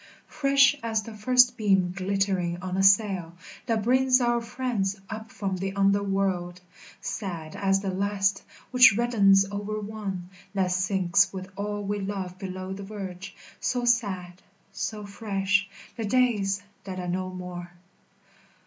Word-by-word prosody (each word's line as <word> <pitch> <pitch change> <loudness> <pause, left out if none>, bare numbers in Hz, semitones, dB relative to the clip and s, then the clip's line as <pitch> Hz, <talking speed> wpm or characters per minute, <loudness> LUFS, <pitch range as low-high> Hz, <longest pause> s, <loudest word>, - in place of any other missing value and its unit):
Fresh 275 -1 +4
as 225 -2 -1
the 225 - -9
first 245 +3 +4
beam 195 -5 +2
glittering 190 -2 0
on 185 0 -3
a 190 - +1
sail, 195 -4 +3 0.3
That 225 -2 0
brings 255 +2 +4
our 240 -1 +1
friends 230 -5 -2
up 220 0 -7
from 195 -2 -3
the 195 +1 -3
under 200 0 +3
world; 190 -3 -1 0.4
Sad 170 -7 -5
as 195 -1 +1
the 195 -1 -2
last 195 0 0 0.3
which 250 -5 +7
reddens 200 -5 +4
over 205 +1 -3
one 200 -4 -5 0.3
That 185 -2 +1
sinks 190 +1 +2
with 190 0 -7
all 205 +1 -3
we 205 +1 -2
love 190 -2 -4
below 185 0 -5
the 195 - -7
verge, 195 -1 -7 0.2
So 245 -1 -1
sad, 190 -7 0 0.3
so 210 -2 -4
fresh, 195 -2 0 0.3
the 225 - -3
days 205 -4 +1 0.2
that 185 -1 -6
are 180 - -4
no 185 +1 -2
more. 180 -1 -7
195 Hz, 145 wpm, -26 LUFS, 185-215 Hz, 0.4 s, which